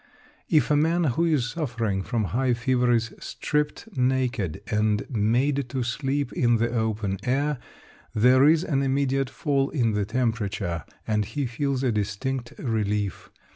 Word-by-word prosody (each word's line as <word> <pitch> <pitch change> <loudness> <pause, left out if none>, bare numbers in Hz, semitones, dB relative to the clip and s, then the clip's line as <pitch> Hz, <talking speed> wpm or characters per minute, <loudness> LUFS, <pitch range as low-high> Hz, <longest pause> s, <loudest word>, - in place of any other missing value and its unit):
If 150 -4 +3
a - - +5
man 165 +4 +2
who 160 +3 +1
is 140 -7 +1
suffering 115 - -2
from 115 +2 -1
high 125 0 +2
fever 125 0 +1
is 115 -1 +1
stripped 150 +7 -2
naked, 125 -9 0
and 105 -1 0
made 125 +5 +1
to 130 0 -2
sleep 135 +2 -2
in 120 -1 +3
the 115 +1 0
open 110 -4 -1
air, 140 +3 0 0.6
there 125 +5 +5
is 160 +2 +4
an 140 -6 0
immediate 135 -1 +1
fall 140 -2 0
in 120 -7 +1
the 105 -1 0
temperature, 105 - -2 0.2
and 105 -1 +1
he 145 +6 -3
feels 135 +2 -1
a 130 - +2
distinct 120 +5 -2
relief. 105 - -2
125 Hz, 150 wpm, -25 LUFS, 110-140 Hz, 0.6 s, a